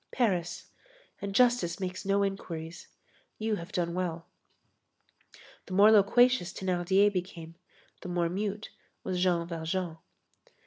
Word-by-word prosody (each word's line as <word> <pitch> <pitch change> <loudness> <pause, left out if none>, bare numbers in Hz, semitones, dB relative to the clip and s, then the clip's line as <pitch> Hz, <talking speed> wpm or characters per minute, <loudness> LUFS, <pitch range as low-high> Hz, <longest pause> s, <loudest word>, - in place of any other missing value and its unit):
Paris. 185 -9 -1 0.6
And 200 -1 -4
justice 240 -8 +3
makes 185 0 -5
no 200 +1 +2
inquiries. 170 -4 -5 0.5
You 220 -1 -1
have 170 +3 -9
done 170 -3 -1
well." 170 -2 -3 1.4
The 185 - -7
more 205 +3 +7
loquacious 220 -1 +4
Thénardier 190 +2 +2
became, 175 -3 -5 0.5
the 180 - -7
more 175 -1 0
mute 205 +4 -4 0.3
was 180 -1 -2
Jean 175 -2 +2
Valjean. 165 0 -3
185 Hz, 120 wpm, -29 LUFS, 170-200 Hz, 1.4 s, more